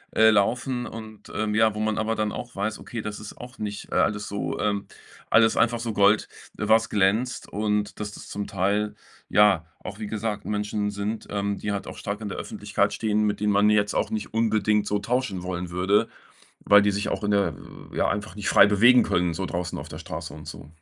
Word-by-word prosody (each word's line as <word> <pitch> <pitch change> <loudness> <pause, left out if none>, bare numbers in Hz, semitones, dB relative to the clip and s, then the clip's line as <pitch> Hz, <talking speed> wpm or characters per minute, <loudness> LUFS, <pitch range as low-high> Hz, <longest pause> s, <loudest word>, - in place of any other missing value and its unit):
äh, 110 0 +7
laufen 120 +4 +1
und, 110 -2 -10
ähm, 105 -1 -1
ja, 110 -1 +4
wo - - -4
man 110 0 0
aber 110 +1 0
dann 110 -1 -1
auch 120 +3 -7
weiß, 105 +2 -2
okay, 115 - -6
das 105 -1 -5
ist 105 - -9
auch 125 +1 -11
nicht, 105 -1 -6
äh, - - -2
alles 105 -1 +1
so, 100 - -3
ähm 100 -1 0 0.4
alles 115 0 +5
einfach 120 0 +2
so 115 -1 -2
Gold, 105 0 +3 0.3
was 110 +2 +3
glänzt 105 +6 +1
und 105 -1 -1
dass 105 -1 -4
das - - -11
zum 100 0 -4
Teil, 100 +2 0 0.3
ja, 100 -5 +4 0.2
auch 105 - -7
wie 105 - -4
gesagt 105 0 -3
Menschen 105 0 -1
sind, 105 +2 -4
ähm, 100 0 -1
die 105 - -3
halt 100 - -4
auch - - -8
stark 105 +1 -4
in 105 - -4
der - - -5
Öffentlichkeit - - -1
stehen, 105 -1 0
mit 105 -1 -1
denen 105 0 +2
man 100 +1 +4
jetzt 105 -1 +2
auch - - +1
nicht 110 -1 -4
unbedingt 110 -2 +2
so 105 0 0
tauschen 110 -4 -1
wollen 90 -1 -4
würde, 90 +4 +2 0.6
weil 105 0 +7
die 105 - +3
sich 100 +1 -2
auch - - -2
in 105 - 0
der 100 -6 +2 0.4
ja, - - +1
einfach 105 +2 -3
nicht 105 -1 -4
frei - - +7
bewegen 120 +5 +6
können, 90 -1 +1
so 95 +3 -3
draußen 85 0 -3
auf - - -7
der - - -8
Straße - - -7
und - - -11
so. - - -9
105 Hz, 220 wpm, -25 LUFS, 100-110 Hz, 0.6 s, äh